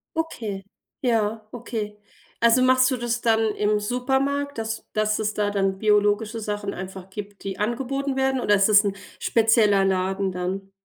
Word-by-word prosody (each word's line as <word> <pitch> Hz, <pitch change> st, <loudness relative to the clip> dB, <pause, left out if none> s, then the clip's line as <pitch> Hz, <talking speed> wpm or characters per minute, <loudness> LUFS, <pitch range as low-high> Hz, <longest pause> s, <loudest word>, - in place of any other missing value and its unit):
Okay. 220 Hz, -12 st, -4 dB, 0.4 s
Ja, 220 Hz, -3 st, 0 dB
okay. 220 Hz, -3 st, -5 dB, 0.4 s
Also, 235 Hz, +2 st, +5 dB
machst 255 Hz, +1 st, +4 dB
du 255 Hz, -, 0 dB
das 235 Hz, 0 st, -2 dB
dann 225 Hz, -2 st, +2 dB
im 210 Hz, 0 st, +1 dB
Supermarkt, 265 Hz, +5 st, -1 dB
dass 225 Hz, 0 st, -4 dB
dass 215 Hz, 0 st, +1 dB
es 215 Hz, 0 st, -1 dB
da 205 Hz, -1 st, 0 dB
dann 195 Hz, -1 st, 0 dB
biologische 210 Hz, +2 st, +2 dB
Sachen 205 Hz, -1 st, -3 dB
einfach 190 Hz, 0 st, -8 dB
gibt, 205 Hz, 0 st, -9 dB
die 195 Hz, 0 st, -5 dB
angeboten 265 Hz, +5 st, -2 dB
werden, 265 Hz, -1 st, +1 dB
oder 205 Hz, -, +3 dB
ist 195 Hz, +1 st, +4 dB
das 210 Hz, 0 st, +7 dB
'n 200 Hz, -1 st, -1 dB, 0.2 s
spezieller 215 Hz, -3 st, +3 dB
Laden 190 Hz, 0 st, 0 dB
dann? 190 Hz, +2 st, -4 dB
215 Hz, 160 wpm, -24 LUFS, 200-240 Hz, 0.4 s, das